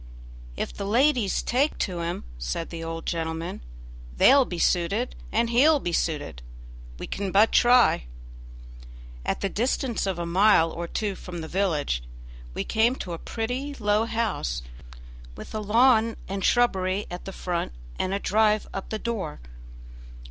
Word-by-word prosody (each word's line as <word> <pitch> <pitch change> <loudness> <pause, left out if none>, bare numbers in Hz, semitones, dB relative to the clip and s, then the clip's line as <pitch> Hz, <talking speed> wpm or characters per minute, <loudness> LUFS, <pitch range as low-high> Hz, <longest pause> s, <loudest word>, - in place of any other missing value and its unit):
"If - - -3
the 200 - -5
ladies 240 -1 +2
take 275 +5 +1
to 180 -4 -2
him," 170 +1 -3 0.2
said - - -4
the 165 -1 -6
old 165 0 -5
gentleman, 165 +1 -3 0.6
"they'll 275 -1 +6
be 175 - -5
suited 195 +8 +1 0.2
and 230 +1 +1
he'll 290 +6 +5
be 175 -9 -3
suited. 145 - -2 0.6
We - - -6
can 195 -1 -3
but 210 +4 +5
try." 245 - +5 1.2
At - - -2
the 195 - +1
distance 235 +1 -1
of 190 -3 -1
a 170 - -3
mile 175 -1 +4
or 170 0 -5
two 205 +3 -2
from 180 -2 -8
the 160 - -6
village 160 - 0 0.5
we - - -1
came 230 +3 +2
to 180 -9 -6
a 165 - -5
pretty, 250 +5 -4
low 210 -2 +1
house, 220 - -2 0.7
with - - -9
a 215 - -2
lawn 225 +1 +4
and 195 0 -4
shrubbery 195 -5 +2
at 175 - -7
the 195 - -5
front 175 - -3 0.3
and 185 - 0
a 195 - +1
drive 215 +1 +2
up 195 - -5
to 220 - -2
the - - -15
door. 220 - -3
200 Hz, 160 wpm, -26 LUFS, 170-230 Hz, 1.2 s, they'll